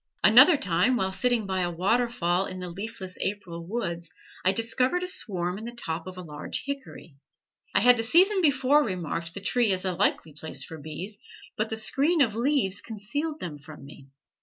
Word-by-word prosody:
Another 260 - +8
time 250 +1 +2
while 190 -5 0
sitting 240 +2 +1
by 190 -1 -1
a 175 - 0
waterfall 190 -1 +1
in 185 - -6
the 180 -1 -5
leafless 190 0 -7
April 180 -4 -4
woods 170 -6 -3 0.3
I 185 - +4
discovered 250 - 0
a - - -2
swarm 185 - -3
in 220 - -8
the 240 - -6
top 165 -7 -4
of 185 0 -8
a 180 - -7
large 150 -3 -5
hickory. 275 - -7 0.6
I - - +5
had 245 0 +6
the - - 0
season 370 - +4
before 285 -1 +4
remarked 170 - -4
the 200 - -5
tree 230 +2 +2
as 185 0 -1
a 185 - 0
likely 160 -2 0
place 155 +2 -3
for 160 - -9
bees, 180 +8 -6 0.4
but 215 +1 -1
the 220 - -2
screen 290 +9 +1
of 230 -7 +3
leaves 235 -5 +1
concealed 285 +9 -4
them 150 -4 -6
from 145 -1 -12
me. 140 -1 -14
200 Hz, 190 wpm, -27 LUFS, 175-250 Hz, 0.6 s, Another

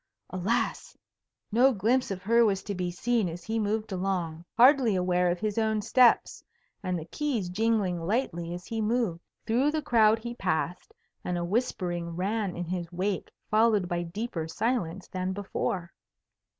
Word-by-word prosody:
Alas! 220 - -1 0.5
no 250 +5 +5
glimpse 240 +4 +1
of 185 -2 -5
her 230 +4 +4
was 195 -3 +1
to 205 - -4
be 180 -2 -2
seen 220 +2 0
as 170 +1 -8
he 225 +4 -2
moved 215 0 -1
along, 180 -4 -2
hardly 250 -3 +6
aware 180 -1 +2
of 175 - 0
his 215 +2 -1
own 220 -1 +1
steps, 235 +3 +3 0.4
and 185 -3 -1
the 160 - -6
keys 240 - -2
jingling 200 -3 +1
lightly 175 -3 -1
as 175 +1 -6
he 225 -1 -3
moved. 215 -6 0 0.2
Through 245 +6 +2
the 310 0 -1
crowd 225 -5 +4
he 235 +1 -6
passed, 180 - -2 0.3
and 180 - -2
a 175 - -2
whispering 175 -5 -2
ran 195 +1 -1
in 175 - -3
his 175 0 -4
wake 185 +2 -2 0.2
followed 215 -3 +3
by 175 -1 -1
deeper 175 -1 -4
silence 190 -2 -2
than 185 0 -3
before. 190 -3 -3
200 Hz, 165 wpm, -28 LUFS, 175-230 Hz, 0.5 s, hardly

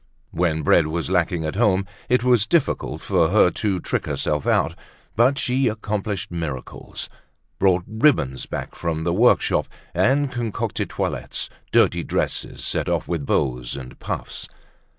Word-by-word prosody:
When 80 -2 0
bread 75 +2 +4
was 85 +3 -2
lacking 90 -2 +1
at 80 - -3
home 100 -4 +3 0.2
it 125 0 +3
was 120 -4 +3
difficult 130 - 0
for 85 -5 +2
her 95 -2 +5
to 100 -4 -1
trick - - -2
herself 75 -2 -1
out. - - +2 0.4
But 125 +5 +4
she 130 0 +1
accomplished 105 -3 -3
miracles, 80 -7 -5 0.5
brought 95 -2 +3
ribbons 110 - +2
back - - -5
from 80 -1 -3
the 85 +1 0
workshop 115 +7 +3 0.3
and 140 +1 +2
concocted 120 -4 -2
toilettes—dirty - - -1
dresses - - -2
set - - 0
off - - 0
with 80 -5 -3
bows 60 -2 0
and 65 -2 -9
puffs. - - -5
95 Hz, 140 wpm, -23 LUFS, 80-115 Hz, 0.5 s, her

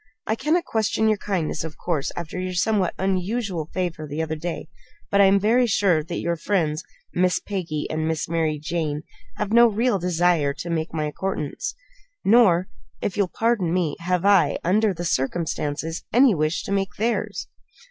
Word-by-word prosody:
I 220 - 0
cannot 310 +9 +1
question 220 0 +1
your 215 -2 +2
kindness, 180 -6 -2
of 160 -2 -7
course, 155 -6 -2
after 170 +1 -5
your 185 0 -3
somewhat 190 0 +1
unusual 190 -2 -1
favor 170 -4 -3
the 150 +3 -2
other 160 0 -3
day; 165 +1 -5 0.4
but 200 - +5
I - - +7
am 195 +1 +5
very 235 +5 +3
sure 190 -7 +2
that 170 +2 -5
your 170 0 -1
friends, 160 -3 0 0.3
Miss 180 0 +2
Peggy, 175 -7 -3
and 155 0 -2
Miss 160 -1 -1
Mary 160 -2 0
Jane, 155 -1 -2 0.3
have 210 0 -3
no 235 +1 +8
real 225 -1 +1
desire 170 -5 +2
to 170 +4 -5
make 160 0 -1
my 155 -1 -2
acquaintance, 190 - -3 0.5
nor 195 -5 +5 0.3
if 190 - -2
you'll 200 -2 +2
pardon 220 -4 0
me 170 -5 0
have 180 +2 -1
I, 200 -2 +4
under 210 +4 +3
the 175 -1 -5
circumstances, 160 +1 -1
any 250 0 +6
wish 155 0 0
to - - -6
make 195 -1 -1
theirs." 230 +2 -1
180 Hz, 175 wpm, -23 LUFS, 160-205 Hz, 0.5 s, no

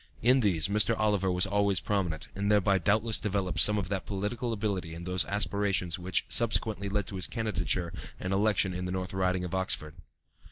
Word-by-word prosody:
In 125 +3 +5
these 95 -8 +2
Mr. 105 +2 +2
Oliver 105 -3 +1
was 90 +1 +2
always 100 -1 +2
prominent, 95 -6 -2
and 100 +1 -1
thereby 100 -2 +3
doubtless 110 +5 +2
developed 95 -4 -1
some 105 0 +5
of 100 -3 -2
that 100 -2 -3
political 105 +5 -3
ability 100 -6 -3
and 85 +1 -8
those 90 0 0
aspirations 100 -3 0
which 90 +1 0
subsequently 110 -3 +1
led 100 0 -1
to 95 - -6
his 90 - +1
candidature 90 -6 -2 0.3
and 90 +1 -3
election 100 -2 +2
in 90 0 -4
the 90 - -3
North 95 0 -4
Riding 95 -1 0
of 90 - -5
Oxford. 95 -5 -2
100 Hz, 190 wpm, -29 LUFS, 90-105 Hz, 0.3 s, In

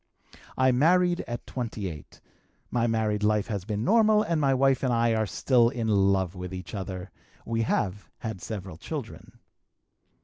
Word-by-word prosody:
"I 130 0 +4
married 175 +7 +3
at 120 0 -5
28. 105 - -6 0.5
My 120 -1 +1
married 110 -2 0
life 105 -1 +2
has 100 -4 -3
been 105 0 -2
normal 215 - +4
and 165 -4 0
my 135 -1 +3
wife 135 0 +3
and 130 - +1
I 115 -1 +2
are 110 -1 0
still 120 +5 +3
in 120 -3 -3
love 95 -3 +2
with 90 -1 -7
one 90 -1 -5
another; 95 -3 -6 0.3
we 115 0 -1
have 105 -3 -1
had 110 -6 -6
several 95 -6 -6
children. - - -7
110 Hz, 160 wpm, -27 LUFS, 100-130 Hz, 0.5 s, I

